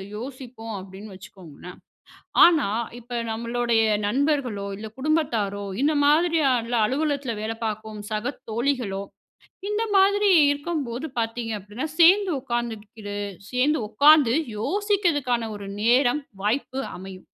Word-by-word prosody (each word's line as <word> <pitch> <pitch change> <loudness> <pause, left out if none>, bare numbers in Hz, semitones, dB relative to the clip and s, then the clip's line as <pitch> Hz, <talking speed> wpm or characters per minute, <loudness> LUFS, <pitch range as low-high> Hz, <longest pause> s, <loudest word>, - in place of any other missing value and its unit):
யோசிப்போம் 240 -2 -8
அப்டின்னு 195 +2 -10
வச்சுக்கோங்களேன், 180 -2 -12 0.7
ஆனா, 335 -3 +4 0.3
இப்ப 240 0 -5
நம்மளுடைய 235 0 0 0.2
நண்பர்களோ, 255 -4 0
இல்ல 220 +2 -7
குடும்பத்தாரோ 240 -9 0 0.2
இந்த 300 +2 +3
மாதிரியான, 290 -7 +2
அலுவலகத்துல 280 -3 -1
வேல 220 +1 -2
பார்க்கும் 215 0 -5
சக 215 +6 -2 0.2
தோழிகளோ, 235 -4 -1 0.7
இந்த 420 +2 0
மாதிரி 400 +1 +4 0.2
இருக்கும்போது 285 -3 -4
பாத்தீங்க 225 0 -3
அப்டின்னா, 210 +9 -5
சேர்ந்து 375 +3 +6
உட்கார்ந்துக்கிறது 220 -4 -5 0.3
சேர்ந்து 260 +4 +1
உட்காந்து 285 -1 +5 0.2
யோசிக்கிறதுக்கான 295 - 0
ஒரு 200 -1 -8
நேரம், 245 +5 +3 0.2
வாய்ப்பு 260 +5 -1 0.2
அமையும். 185 0 -10
245 Hz, 105 wpm, -24 LUFS, 215-290 Hz, 0.7 s, சேர்ந்து